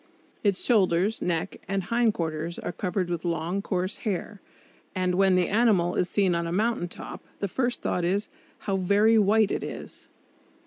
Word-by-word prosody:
Its 200 -3 +2
shoulders, 200 -2 +2
neck 170 +1 -2
and 195 -1 -1
hindquarters 170 -7 -1
are - - -4
covered 185 -1 -2
with 175 -2 -3
long, 175 +2 -1
coarse 185 0 -2
hair, 205 0 -4 0.5
and 185 -1 0
when 190 0 +4
the 180 -1 +2
animal 205 -5 +3
is 180 - 0
seen 195 -3 +2
on 170 0 -1
a - - -3
mountain 215 0 0
top - - -8 0.2
the 200 - -1
first 245 +4 -2
thought 180 - 0
is: 195 +5 0 0.3
"How 195 -2 -1
very 205 +4 +4
white 210 +1 +3
it - - -2
is!" - - -8
190 Hz, 170 wpm, -26 LUFS, 175-210 Hz, 0.5 s, when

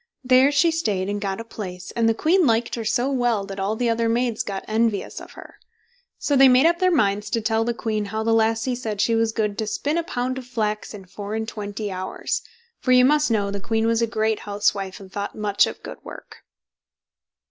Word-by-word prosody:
There 260 +2 +5
she 310 +4 +3
stayed 205 - -1
and 205 0 -3
got 195 -1 -2
a - - -5
place, 180 -5 -8
and 230 -1 +2
the 225 - +1
queen 335 +5 +3
liked 230 +1 +1
her 230 - -3
so 245 +4 0
well, 240 -6 +1
that 195 0 -7
all 200 +3 -1
the 240 +2 0
other 230 0 +1
maids 235 -1 0
got 195 -1 -5
envious 220 -2 -1
of - - -12
her. - - -13 0.6
So 285 - 0
they 270 0 +8
made 255 +3 +5
up 340 +1 +3
their 370 -1 +4
minds 210 - +1
to 230 - 0
tell 225 0 +1
the 235 0 -2
queen 215 -2 -2
how 220 +2 -3
the 225 0 +2
lassie 225 +2 +2
said 225 -4 -4
she 230 - +2
was 225 0 +2
good 210 -2 -2
to 220 - -1
spin 290 +9 -1
a - - -2
pound 255 -3 -3
of 250 - -11
flax 215 -3 -2
in 195 -2 -11
four 200 +3 -6
and 220 0 -3
twenty 205 -1 -5
hours, 185 0 -3 0.4
for 255 - 0
you 250 0 +7
must 300 +1 +3
know 205 -3 +1
the 200 - -4
queen 220 +2 0
was 230 0 +2
a 230 - +2
great 220 -1 0
housewife, 200 -2 -1
and 190 -2 -13
thought 200 +1 -4
much 205 -1 +2
of - - -8
good - - -9
work. - - -11
225 Hz, 230 wpm, -23 LUFS, 205-245 Hz, 0.6 s, they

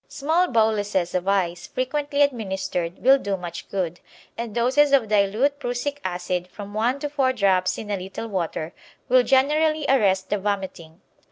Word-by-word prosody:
Small 320 +5 +1
boluses 210 - +1
of 180 0 -1
ice 180 -3 0
frequently 285 +3 0
administered 190 -9 -2
will 270 +2 +6
do 200 -4 -2
much 175 -2 -8
good, 180 -3 -3 0.4
and 230 -2 -6
doses 270 +5 +3
of 260 -5 +4
dilute 215 +8 +2
prussic 275 +2 -3
acid, 180 0 -3
from 205 +2 -10
one 235 +5 +1
to 295 - -1
four 280 -3 +1
drops 185 -4 +2
in 210 -2 -6
a 200 - 0
little 190 +4 -6
water, 170 -4 -3 0.4
will 255 +1 +6
generally 300 +4 +2
arrest 195 -8 +2
the 205 - +1
vomiting. 190 -5 -4
210 Hz, 160 wpm, -23 LUFS, 185-270 Hz, 0.4 s, will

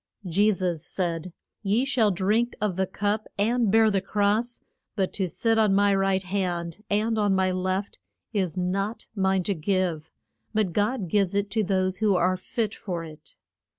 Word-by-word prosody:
Je 195 +5 +3
sus 180 -5 -2
said, 175 -1 -3 0.3
Ye 220 +5 +1
shall 250 -6 +2
drink 210 +6 +1
of 210 -3 0
the 190 0 0
cup, 205 +3 -1
and 230 +2 +2
bear 220 0 +5
the 195 -1 +1
cross, 210 +4 0 0.4
but 190 -4 -1
to 190 -3 -1
sit 225 +5 +1
on 210 -3 +4
my 200 0 +4
right 195 -1 +1
hand 180 -1 -3
and 220 +2 +1
on 205 -2 +2
my 190 0 +2
left 185 +2 -2 0.3
is 185 -5 -1
not 195 +5 -2
mine 190 -2 +2
to 200 - 0
give; 170 -2 -1 0.5
but 210 -5 +1
God 210 0 0
gives 200 +2 +1
it 200 0 0
to 220 +1 +1
those 185 -1 0
who 210 -2 +2
are 185 +1 +2
fit 215 +3 -3
for 175 -4 -5
it. 155 -2 -12
195 Hz, 175 wpm, -26 LUFS, 185-210 Hz, 0.5 s, bear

